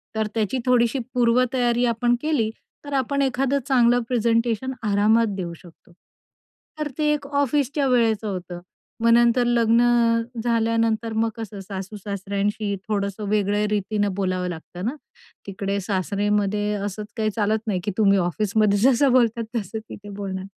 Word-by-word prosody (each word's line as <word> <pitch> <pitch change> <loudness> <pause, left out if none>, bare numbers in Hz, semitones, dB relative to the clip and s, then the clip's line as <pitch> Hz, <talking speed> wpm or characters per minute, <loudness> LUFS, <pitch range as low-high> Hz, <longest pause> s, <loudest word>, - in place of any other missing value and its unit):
तर 220 -1 0
त्याची 225 +3 0
थोडीशी 250 +1 +3
पूर्वतयारी 245 0 +2
आपण 240 +1 +1
केली, 295 -8 +1 0.4
तर 285 - -6
आपण 275 +1 0
एखादं 270 +1 +1
चांगलं 245 -2 +4
प्रेझेंटेशन 235 +1 0
आरामात 215 +2 +3
देऊ 170 -2 -4
शकतो. 175 0 -18 0.9
तर 300 - -1
ते 300 -1 +2
एक 290 -1 -4
ऑफिसच्या 285 0 0
वेळेचं 225 -4 +2
होतं. 180 -3 -5 0.4
मग 230 - +3
नंतर 240 +1 +4
लग्न 235 -1 +3 0.6
झाल्यानंतर, 230 -1 +1
मग 225 +1 +1
कसं 215 -3 -7
सासू-सासऱ्यांशी 200 +1 -3
थोडंसं 200 0 -2
वेगळ्या 205 0 +1
रीतीनं 205 -1 -1
बोलावं 185 -2 -1
लागतं 175 +3 -7
ना, 250 - -2 0.5
तिकडे 200 +1 -2
सासऱेमध्ये 205 +2 0
असंच 205 +1 -4
काही 215 -1 +1
चालत 215 0 +1
नाही, 190 -4 0
की 205 - -2
तुम्ही 200 -2 +4
ऑफिसमध्ये 205 +3 +1
जसं 260 +3 +4
बोलतात, 235 -2 +3
तसं 220 +1 -4
तिथे 205 0 -10
बोलणार. 195 -2 -5
220 Hz, 135 wpm, -23 LUFS, 200-240 Hz, 0.9 s, चांगलं